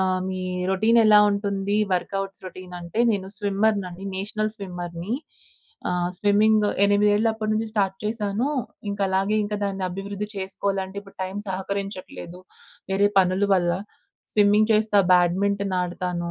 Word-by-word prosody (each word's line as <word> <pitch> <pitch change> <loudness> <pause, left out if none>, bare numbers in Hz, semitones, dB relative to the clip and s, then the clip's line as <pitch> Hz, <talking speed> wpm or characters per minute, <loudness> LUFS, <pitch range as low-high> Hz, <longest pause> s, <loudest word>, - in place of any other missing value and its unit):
ఆహ్, 185 -1 +1
మీ 185 0 -3 0.3
రొటీన్ 220 +5 +3
ఎలా 210 -1 +7
ఉంటుంది, 200 0 -1 0.2
వర్కౌట్స్ 195 +1 -2
రొటీన్ 185 0 -10
అంటే 170 +6 -3
నేను 195 -3 -1
స్విమ్మర్‌నండి. 200 -2 0
నేషనల్ 215 +2 -2
స్విమ్మర్‌ని. 180 -1 -6 0.8
ఆహ్, 180 0 0
స్విమ్మింగ్గు 210 +1 +3
ఎనిమిదేళ్లప్పడు 210 +2 +2
నుంచి 220 +1 0
స్టార్ట్ 195 -3 0
చేశాను. 215 +3 -1 0.4
ఇంక 200 - -5
అలాగే 195 +3 +1
ఇంకా 210 0 -3
దాన్ని 195 -1 -2
అభివృద్ధి 200 +2 -5
చేసుకోవాలంటే, 195 0 -3
ఇప్పుడు 200 -1 -17
టైం 190 +1 -4
సహకరించట్లేదు 190 -2 -5 0.5
వేరే 200 +1 +3
పనులు 190 +2 +2
వల్ల. 175 -2 +2 0.6
స్విమ్మింగ్ 210 +1 +4
చేస్తా, 215 -1 +3
బ్యాడ్మింటన్ 195 +2 +2
ఆడతాను. 175 -1 -3
200 Hz, 125 wpm, -24 LUFS, 185-210 Hz, 0.8 s, ఎలా